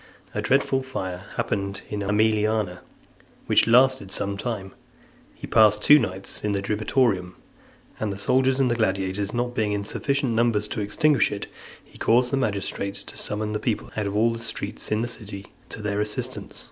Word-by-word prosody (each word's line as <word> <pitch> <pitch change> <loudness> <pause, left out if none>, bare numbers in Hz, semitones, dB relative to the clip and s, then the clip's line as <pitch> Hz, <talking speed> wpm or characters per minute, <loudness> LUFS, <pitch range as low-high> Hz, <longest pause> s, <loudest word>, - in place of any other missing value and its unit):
A - - -2
dreadful 135 0 +2
fire 95 -8 -5
happening 100 -1 -2
in 105 - -3
the 100 - -3
Aemiliana, 105 -2 +1 0.7
which - - +4
lasted 125 -3 +4
some 100 0 0
time, 100 -3 -5 0.6
he - - -8
passed 105 -2 +4
two 150 0 +8
nights 95 -5 -3
in 105 -1 0
the 100 - 0
Diribitorium, 105 -3 0 0.6
and 110 -2 -2
the 100 - -5
soldiers 130 +5 +3
and 125 -3 +2
gladiators 100 -2 -1
not 120 0 -2
being 110 -4 0
in 100 0 -2
sufficient 140 +4 0
numbers 115 -2 +1
to 105 - -3
extinguish 145 +7 +2
it, 100 -1 -4 0.4
he - - -18
caused 125 +2 +3
the 140 - +1
magistrates 100 -4 -1
to - - -6
summon 105 0 -1
the 105 - -1
people 115 -1 -2
out 105 -2 -1
of 100 - -4
all 115 +2 +3
the 115 - -5
streets 115 - -3
in 110 +1 +1
the - - -2
city, 105 -4 -4 0.2
to 105 - -7
their 105 0 -1
assistance. 105 0 -2
105 Hz, 180 wpm, -24 LUFS, 100-120 Hz, 0.7 s, two